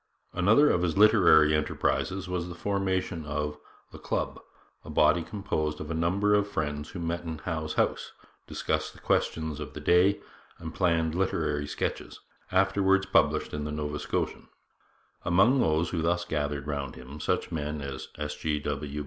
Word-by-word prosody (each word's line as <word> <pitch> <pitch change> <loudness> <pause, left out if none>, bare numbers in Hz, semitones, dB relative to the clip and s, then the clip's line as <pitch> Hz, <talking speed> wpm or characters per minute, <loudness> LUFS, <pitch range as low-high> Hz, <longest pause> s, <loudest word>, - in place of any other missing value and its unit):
Another 105 +11 +5
of 90 - +1
his 90 0 0
literary 90 -8 +6
enterprises 90 +5 -1
was 90 -1 -3
the 85 - -7
formation 95 -3 -1
of 75 0 -3 0.3
'The - - -11
Club,' - - -2 0.4
a - - -11
body 85 - +4
composed 80 -5 -3
of 75 +1 -6
a - - -1
number 95 +6 +1
of 105 0 +3
friends 75 -4 -3
who 90 - -7
met 85 0 -2
in 80 -1 -5
Howe's 80 -1 -4
house, - - 0 0.4
discussed - - -2
the - - -16
questions 80 -2 -1
of 75 - -7
the - - -7
day, 95 +3 +4 0.4
and 80 -1 -7
planned 80 -3 +1
literary 80 -5 -1
sketches, - - -4 0.3
afterwards 95 +1 +3
published - - +2
in 75 0 -3
the 75 - -4
Nova 75 0 -3
Scotian. - - -3 0.8
Among 100 +10 +4
those 80 -5 +1
who 85 - -1
thus 85 +2 0
gathered 75 -3 -2
round 70 -2 -4
him, 65 +4 -10
such - - -1
men 75 -1 -3
as 70 -1 -6
S. 75 0 -4
G. 75 -1 -1
W. 75 0 -4
80 Hz, 165 wpm, -28 LUFS, 75-90 Hz, 0.8 s, literary